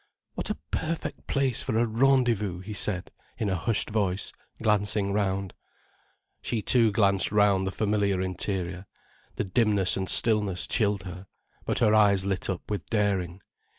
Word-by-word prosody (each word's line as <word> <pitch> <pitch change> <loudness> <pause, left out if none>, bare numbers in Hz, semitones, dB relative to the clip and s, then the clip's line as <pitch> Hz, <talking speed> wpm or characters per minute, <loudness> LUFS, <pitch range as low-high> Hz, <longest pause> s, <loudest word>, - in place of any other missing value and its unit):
"What - - -5
a - - -2
perfect 165 0 -3
place 135 -4 0
for 110 - -1
a 120 - +3
rendezvous," 115 -6 +1
he 105 +3 -7
said, 95 -3 -2 0.3
in 105 - -1
a - - +1
hushed 105 +6 +1
voice, 100 -3 -1 0.3
glancing 105 -2 +1
round. 100 -2 -1 0.9
She 115 -3 -2
too 115 -1 +4
glanced 100 -3 +2
round 100 -2 +3
the - - -2
familiar 100 -2 0
interior. 95 0 -3 0.5
The - - -1
dimness 100 -2 +2
and 95 -1 -3
stillness 105 -5 +2
chilled 100 -3 0
her. 90 +1 -9 0.4
But - - -1
her 105 - +4
eyes 100 -3 +4
lit 95 -1 -2
up 90 -2 -4
with 100 -4 -3
daring. 95 -4 -1
100 Hz, 150 wpm, -27 LUFS, 95-110 Hz, 0.9 s, too